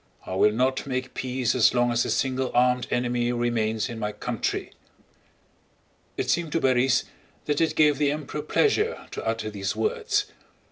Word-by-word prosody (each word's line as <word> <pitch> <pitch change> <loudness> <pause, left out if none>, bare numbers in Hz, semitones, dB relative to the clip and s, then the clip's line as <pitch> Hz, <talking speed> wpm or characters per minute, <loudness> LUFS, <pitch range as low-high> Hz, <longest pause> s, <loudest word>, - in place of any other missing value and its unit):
I - - -5
will 100 +3 +4
not 130 +5 0
make 130 -1 -3
peace 130 -2 -1
as 125 -1 +4
long 120 0 +3
as 120 0 +1
a - - -3
single 130 -1 0
armed 125 0 +3
enemy 120 0 0
remains 115 -2 0
in 115 -3 -7
my 105 -1 -2
country!" 105 - -3 1.5
It - - -1
seemed 170 -3 0
to 165 - +2
Borís 130 -1 +3 0.4
that 150 0 0
it 165 - +1
gave 150 -2 +4
the 145 -1 +3
Emperor 150 0 -4
pleasure 425 - +1
to - - -5
utter 115 -1 -2
these 100 -1 -3
words. 435 -2 0
125 Hz, 170 wpm, -25 LUFS, 120-150 Hz, 1.5 s, will